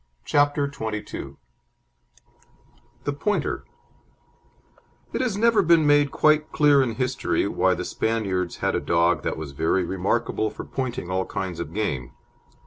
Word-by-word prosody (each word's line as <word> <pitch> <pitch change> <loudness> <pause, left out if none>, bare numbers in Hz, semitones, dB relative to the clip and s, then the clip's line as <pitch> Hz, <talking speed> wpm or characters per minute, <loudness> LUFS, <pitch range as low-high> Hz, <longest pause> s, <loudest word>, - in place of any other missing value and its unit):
CHAPTER 145 0 +2
XXII 110 -7 -5 1.7
THE 145 - -1
POINTER 205 +9 -1 1.5
It - - -1
has 240 -6 -1
never 230 -1 +4
been 165 -3 +4
made 145 -1 +4
quite 155 +2 +2
clear 145 -2 +5
in 120 -4 -1
history 125 +1 0
why - - +2
the - - -4
Spaniards 100 -6 -1
had - - +2
a - - +1
dog 85 +1 +2
that - - -3
was 80 -3 -6
very 80 +6 +1
remarkable 100 +4 -1
for - - -8
pointing 130 -8 -4
all 95 0 -1
kinds 90 -3 -4
of 85 -2 -5
game. 75 - -3
120 Hz, 135 wpm, -24 LUFS, 95-145 Hz, 1.7 s, clear